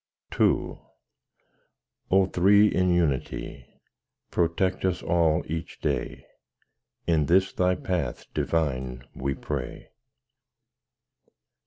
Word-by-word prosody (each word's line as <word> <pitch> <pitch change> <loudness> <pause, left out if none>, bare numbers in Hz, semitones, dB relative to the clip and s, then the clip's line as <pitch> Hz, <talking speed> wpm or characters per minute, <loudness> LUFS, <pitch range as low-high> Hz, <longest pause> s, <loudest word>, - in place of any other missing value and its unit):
_ - - -4 0.3
II - - -16 1.3
O 95 0 +4
Three 100 +3 +5
in 90 0 +1
Unity! 70 -6 -1 0.6
Protect 90 +2 0
us 95 -1 0
all 85 -1 +2
each 80 +1 -6
day: - - -3 0.8
In 80 -4 +2
this 95 +2 +3
Thy 90 0 +2
path 85 -9 -3
divine 65 -6 -1
we 70 +1 -3
pray. - - -6
85 Hz, 95 wpm, -26 LUFS, 75-90 Hz, 1.3 s, Three